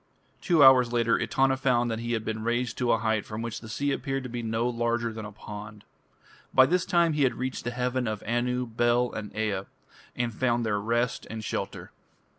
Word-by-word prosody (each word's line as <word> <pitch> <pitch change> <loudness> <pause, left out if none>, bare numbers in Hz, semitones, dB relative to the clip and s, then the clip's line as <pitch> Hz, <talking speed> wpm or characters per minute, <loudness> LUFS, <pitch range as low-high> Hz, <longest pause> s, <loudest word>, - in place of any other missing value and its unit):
Two 165 -6 +4
hours 130 -3 +7
later 115 -1 +2
Etana 135 0 +2
found 125 -3 +1
that 110 - -2
he 120 0 -3
had 110 -1 -2
been 110 0 -3
raised 120 0 -1
to 125 -1 +2
a - - +4
height 110 -2 0
from 110 +1 -6
which 115 -1 -5
the 110 - -10
sea 140 +5 -1
appeared 135 -1 -2
to 125 - -6
be 120 0 -4
no 115 +1 -1
larger 120 -1 -1
than 110 -1 -6
a 105 - -8
pond. 105 0 -9 0.7
By 130 - +8
this 180 +4 +1
time 170 -3 +3
he 150 - 0
had 130 -2 +3
reached 130 -1 -4
the - - 0
heaven 125 0 -1
of 110 -2 -3
Anu, 125 +2 0
Bel, 120 +1 +1
and 105 -1 -6
Ea, 105 -3 -1 0.5
and 120 -1 -1
found 120 0 0
there 105 -2 0
rest 115 +3 -1
and 110 -1 -6
shelter. - - -4
120 Hz, 215 wpm, -27 LUFS, 110-125 Hz, 0.7 s, By